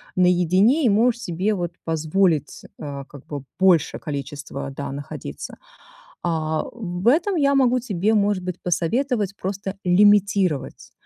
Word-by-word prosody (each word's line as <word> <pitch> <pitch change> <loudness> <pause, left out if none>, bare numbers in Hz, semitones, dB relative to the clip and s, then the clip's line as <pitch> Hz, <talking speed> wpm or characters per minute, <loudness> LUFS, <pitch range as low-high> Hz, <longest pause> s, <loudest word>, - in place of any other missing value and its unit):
наедине, 185 - +3
и - - +5
можешь 235 +3 +2
себе 185 +5 -1
вот 175 -3 -3
позволить, 160 0 0 0.2
э, 140 -2 -6
как 140 -2 -13
бы 145 -3 -6 0.2
больше 180 -5 +3
количество, 140 -1 -6
да, 140 0 -5
находиться. 140 +1 -7 0.7
А, 160 -2 -1
в 190 -3 -4
этом 340 +9 +3
я 280 -3 +3
могу 255 -2 +3
тебе, 215 -3 0
может 205 -2 +1
быть, 180 -1 -5
посоветовать 200 +4 0
просто 195 +1 -4
лимитировать. 195 -5 +2
185 Hz, 130 wpm, -22 LUFS, 160-215 Hz, 0.7 s, и